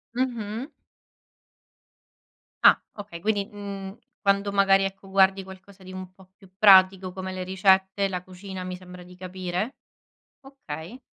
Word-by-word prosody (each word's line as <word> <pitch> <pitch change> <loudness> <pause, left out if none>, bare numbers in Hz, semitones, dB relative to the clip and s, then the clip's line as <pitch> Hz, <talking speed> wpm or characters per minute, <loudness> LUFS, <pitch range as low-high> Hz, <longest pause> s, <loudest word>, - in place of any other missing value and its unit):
Mh-mh. 240 -1 -2 1.9
Ah - - +7
okay, 200 -5 -9
quindi, 205 0 0
mhmm, 200 -1 -7 0.2
quando 200 0 +2
magari, 195 -1 +4
ecco, 195 0 -7
guardi 190 0 +3
qualcosa 190 +1 -14
di 185 - -10
un 185 0 -8
po' 185 0 -20
più 195 -2 -19
pratico 190 -2 +6
come 190 0 -6
le 185 0 -4
ricette, 190 +1 +2
la 180 -2 -4
cucina, 185 0 -8
mi 180 0 -5
sembra 180 0 -12
di 180 +1 -15
capire? 185 +5 -4 0.7
Okay. 245 - -9
190 Hz, 135 wpm, -25 LUFS, 185-200 Hz, 1.9 s, Ah